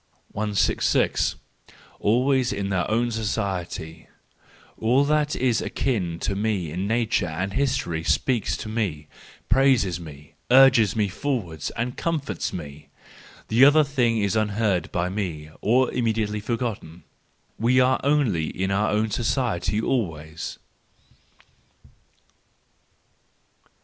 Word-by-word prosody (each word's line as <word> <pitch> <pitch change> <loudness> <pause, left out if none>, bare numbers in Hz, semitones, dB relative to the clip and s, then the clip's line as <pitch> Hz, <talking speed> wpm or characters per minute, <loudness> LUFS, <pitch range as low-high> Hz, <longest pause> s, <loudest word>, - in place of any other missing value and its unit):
166. 105 -1 +1 0.6
Always 125 +3 +2
in 100 -1 -2
our 90 -1 0
own 120 +2 +1
Society. 90 -6 -4 0.7
—All 125 +5 +3
that 150 0 +1
is 125 -3 +1
akin 95 -11 -2
to - - -1
me 100 -6 -1
in 90 +5 -3
nature 110 -3 +1
and 95 +5 -3
history 130 -12 -1
speaks 120 +4 0
to - - -7
me, 100 -10 -3 0.4
praises 120 -9 +3
me, 75 -3 -12 0.2
urges 125 -5 +6
me 105 -2 +1
forward 95 - -3
and 125 +1 -3
comforts 165 -4 -2
me—: 75 -3 -8 0.7
other 150 +2 +7
things 115 -7 0
are - - +3
unheard 105 -3 0
by 90 0 -1
me, 85 -6 -4
or 125 +4 +2
immediately 110 -3 -1
forgotten. 105 -7 -4 0.6
We 120 +3 +3
are 130 +1 +3
only 130 - +1
in 95 +1 -3
our 105 +2 +1
own 110 +1 0
society 110 -5 -1
always. 80 - -3
110 Hz, 110 wpm, -24 LUFS, 90-125 Hz, 0.7 s, other